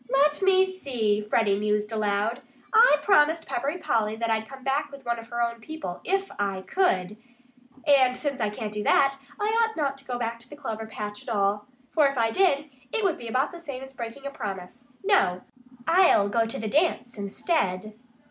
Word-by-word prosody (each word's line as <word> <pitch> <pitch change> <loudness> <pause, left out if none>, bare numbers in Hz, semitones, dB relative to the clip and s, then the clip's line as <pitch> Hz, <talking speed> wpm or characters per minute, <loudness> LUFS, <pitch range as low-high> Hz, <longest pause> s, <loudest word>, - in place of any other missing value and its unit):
"Let 295 +3 +3
me 380 0 +5
see!" 250 - -1
Freddie 210 -1 +1
mused 210 +1 0
aloud. 215 +3 0 0.3
"I 450 -6 +7
promised 325 -3 +4
Peppery 280 +7 -2
Polly 220 -9 0
that 230 0 -1
I'd 220 0 0
come 270 -1 -11
back 285 +2 0
with 275 -2 -12
one 235 -1 -1
of 230 - -11
her 235 0 -1
own 235 0 -3
people 300 - -6
IF 390 +1 -1
I 195 -2 -1
COULD. 210 - +1 0.7
And 260 -4 +4
since 280 -4 -3
I 215 - +1
can't 210 0 -5
do 210 - -3
that, 275 +4 +4 0.2
I 415 - 0 0.2
ought 445 -3 -2
not 275 -3 -1
to 275 - -14
go 250 -2 -3
back 230 -1 -3
to 240 +2 -15
the 295 - -9
clover 225 -6 -5
patch 210 -1 -6
at - - -9
all. 205 -1 0 0.2
For 300 -3 +4
if 275 -1 -3
I 225 -1 +2
did, 300 -3 +2 0.2
it 445 - -1
would 370 -5 +1
be 235 - -7
about 255 +5 0
the 345 -1 -10
same 275 -5 -6
as 270 0 -10
breaking 240 +2 -7
a 280 - -3
promise.... 205 +2 -7 0.2
No! 280 - +2 0.4
I'll 330 - +5
go 225 +1 +1
to 225 - -5
the 220 - -3
dance 285 -2 +1
instead!" 200 - -1
245 Hz, 205 wpm, -26 LUFS, 215-295 Hz, 0.7 s, I